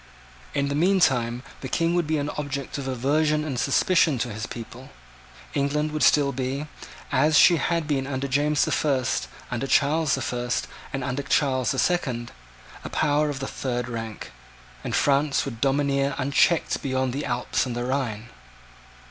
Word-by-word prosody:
In 140 -1 +1
the - - -1
meantime 135 -8 +2 0.2
the 130 - -6
King 165 +4 +1
would 175 -3 +1
be 155 0 +1
an 145 0 -2
object 140 -1 -4
of 135 - -5
aversion 150 +4 +1
and 135 -5 -3
suspicion 155 +2 +3
to 120 -1 -3
his 110 +1 -5
people. 120 +2 -9 0.6
England 150 +2 0
would 155 0 -3
still 145 -2 +4
be, 135 +2 -3 0.5
as 150 +3 +4
she 170 - +7
had 165 +1 0
been 135 -3 0
under 140 0 -2
James 145 +2 +2
the - - -2
First, 135 -5 0 0.2
under 125 +2 -2
Charles 150 +2 +3
the 135 - -4
First, 120 0 -2 0.3
and 135 -1 -3
under 130 +2 -2
Charles 135 -2 +1
the 135 - -1
Second, 125 -9 0 0.5
a - - -6
power 150 0 +1
of 140 -2 -4
the 135 - -3
third 125 -2 -3
rank; 115 -2 -6 0.5
and - - -2
France 140 0 +2
would 120 -4 -7
domineer 140 0 +1
unchecked 145 +4 +2
beyond 130 -2 -1
the 140 +2 -3
Alps 120 +1 -1
and 120 - -4
the 120 0 -2
Rhine. 120 -4 -2
140 Hz, 170 wpm, -25 LUFS, 125-150 Hz, 0.6 s, she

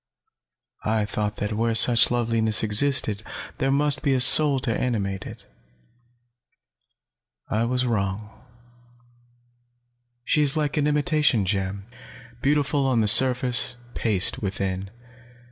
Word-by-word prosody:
I 110 -1 -1
thought 105 0 -4
that 105 +1 -5
where 115 +1 -2
such 120 +1 +6
loveliness 115 -2 0
existed, 110 -1 +2 0.4
there 135 -2 -1
must 145 +1 +1
be 140 -3 0
a - - 0
soul 140 +2 +5
to 120 -4 -3
animate 100 -6 -4
it. - - -13 2.1
I 110 +2 -1
was 125 +1 -2
wrong. 105 -2 -4 1.9
She 150 - +1
is 145 +1 +3
like 150 -2 -2
an 150 -1 0
imitation 150 - +1
gem 100 0 -4 0.6
beautiful 145 0 0
on 125 -4 0
the 105 - 0
surface, 125 +1 +3 0.2
paste 105 -5 -1
within. 95 -1 -5
115 Hz, 115 wpm, -22 LUFS, 105-135 Hz, 2.1 s, such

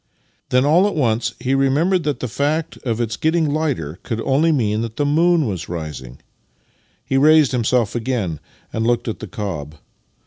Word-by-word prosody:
Then 125 +1 +3
all 170 +7 +4
at 205 - -3
once 120 -6 0
he 130 - -1
remembered 145 +8 +2
that 145 -2 -2
the 125 - -2
fact 145 +7 -1
of 115 -3 -3
its 115 -2 -2
getting 160 0 +1
lighter 125 - -2
could 115 - -4
only 145 +7 +2
mean 110 -7 +1
that 115 -1 -5
the 145 - 0
moon 165 +2 +3
was 95 -7 -4
rising. 75 -7 -6 0.9
He 135 - 0
raised 155 0 +5
himself 120 -2 +1
again, 115 - -2 0.3
and 110 +1 -1
looked 120 0 +1
at 110 - -3
the 110 - -7
cob. 85 -7 -5
125 Hz, 175 wpm, -20 LUFS, 110-150 Hz, 0.9 s, raised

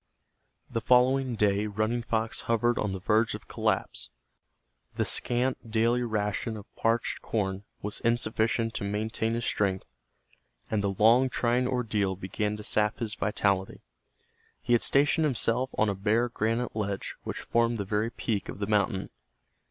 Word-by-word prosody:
The 115 - -3
following 125 +1 +3
day 105 0 +2
Running 110 +3 -1
Fox 115 -1 -1
hovered 120 +1 +2
on 105 - -1
the 95 - -4
verge 110 +4 +2
of - - -10
collapse. - - -1 0.9
The - - 0
scant 125 -1 0
daily 115 +2 +2
ration 110 -1 -2
of 100 - -13
parched 115 +1 0
corn 100 -2 -2 0.2
was 105 0 -3
insufficient 115 0 +1
to - - -3
maintain 110 +2 -1
his 120 - -2
strength, 95 -2 0 0.9
and 110 -2 +1
the 100 - 0
long, 120 +5 +5
trying 125 0 +1
ordeal 110 -7 0
began 105 +3 -3
to 105 - -8
sap 105 0 +1
his 110 -3 -3
vitality. 100 -2 0 0.8
He 120 - 0
had 120 - +4
stationed 145 +3 +3
himself 125 -1 +1
on 110 - +3
a 100 - +1
bare 110 +5 +1
granite 115 +1 -1
ledge 100 -3 -3
which - - -5
formed 115 0 +1
the 100 - -3
very 105 +3 0
peak 110 -3 -3
of - - -6
the 100 - -2
mountain. 105 -1 0
110 Hz, 155 wpm, -28 LUFS, 105-120 Hz, 0.9 s, long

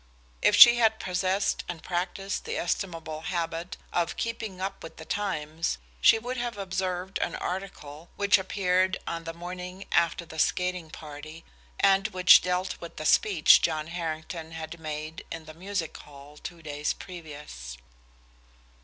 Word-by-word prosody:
If - - +5
she 240 0 +11
had 220 -2 +3
possessed 185 +2 0
and 170 -2 -6
practiced 185 +2 -2
the 460 +2 -3
estimable 165 -4 -3
habit 170 0 -3 0.2
of 170 -1 0
"keeping 225 -5 -4
up 195 +1 -4
with 165 - -10
the 160 - -9
times," 160 - -2 0.2
she - - +7
would 245 +3 -4
have 240 -3 -3
observed 185 -1 -2
an - - -1
article 175 -4 -6
which 200 0 +4
appeared 185 -1 +1
on 165 0 -4
the 165 - -3
morning 180 +2 -7
after 170 0 +2
the 160 -1 -9
skating 180 -1 0
party, 155 +1 -10 0.3
and 195 +1 +4
which 185 -3 +7
dealt 180 +1 -2
with 170 - -8
the 155 - -6
speech 180 -1 +6
John 155 -2 0
Harrington 165 -1 -5
had 160 +1 -7
made 155 0 -5
in 165 -1 -6
the 155 - -10
Music 180 -1 -4
Hall 145 0 -13
two 165 +2 -9
days 150 0 -2
previous. 150 - -9
175 Hz, 150 wpm, -28 LUFS, 160-190 Hz, 0.3 s, she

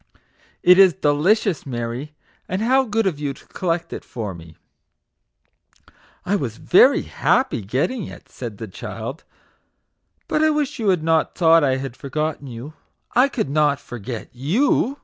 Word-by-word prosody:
" - - -35
It 180 +1 +7
is 190 -4 +7
delicious, 180 +3 +2
Mary; 125 +3 -5 0.3
and 185 +4 -1
how 260 +3 +3
good 225 -1 0
of 170 -7 -1
you 140 -2 -3
to - - -18
collect 170 -2 -2
it - - -6
for 105 -5 -5
me 80 -2 -13 0.5
\" - - -51 0.2
" - - -30
I 200 - +1
was 125 - -3
very 180 - +5
happy 260 - +1
getting 130 - -2
it/' - - -12
said - - -8
the - - -6
child; - - -7 1.0
"but 305 - 0
I 315 - +4
wish 295 -3 -1
you 215 -3 +1
had 180 -4 +2
not 160 0 +1
thought 165 -2 +5
I 130 -2 +2
had 135 -2 -6
forgotten 150 +1 -3
you. 125 +5 -8 0.4
I 255 +3 +5
could 220 - -2
not 145 -1 +2
forget 120 -1 -7
YOU 230 - +1
155 Hz, 170 wpm, -21 LUFS, 135-210 Hz, 1.0 s, It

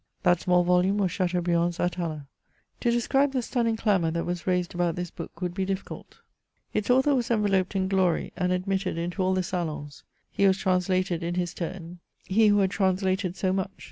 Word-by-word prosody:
That 175 -2 +3
small 180 -1 +3
volume 180 +3 +2
was 190 -4 +1
Chateaubriand's 175 -2 0
Atala. 165 -5 -2 0.5
To 240 - +1
describe 270 +4 +2
the 255 -2 0
stunning 230 -2 0
clamour 200 -7 +1
that 170 +1 -2
was 175 0 -4
raised 180 -1 0
about 175 -1 0
this 175 -1 -4
book 170 - -9
would 180 -1 -2
be 190 +1 -2
difficult. 190 0 -6 0.5
Its 210 +1 -1
author 265 +3 +4
was 245 -4 0
enveloped 205 -4 +1
in 190 -1 +1
glory, 190 -3 +1
and 180 0 0
admitted 185 0 -1
into 175 +3 -3
all 185 0 +2
the 185 - 0
salons. 160 -5 -4 0.3
He 200 - +3
was 190 0 +3
translated 185 -2 0
in 170 +1 -2
his 175 -1 -2
turn 175 0 -6
— - - -33
^he 215 +2 +4
who 205 - +4
had 190 -2 +2
translated 190 -1 0
so 185 -1 0
much. 190 -1 -1
185 Hz, 195 wpm, -26 LUFS, 175-195 Hz, 0.5 s, author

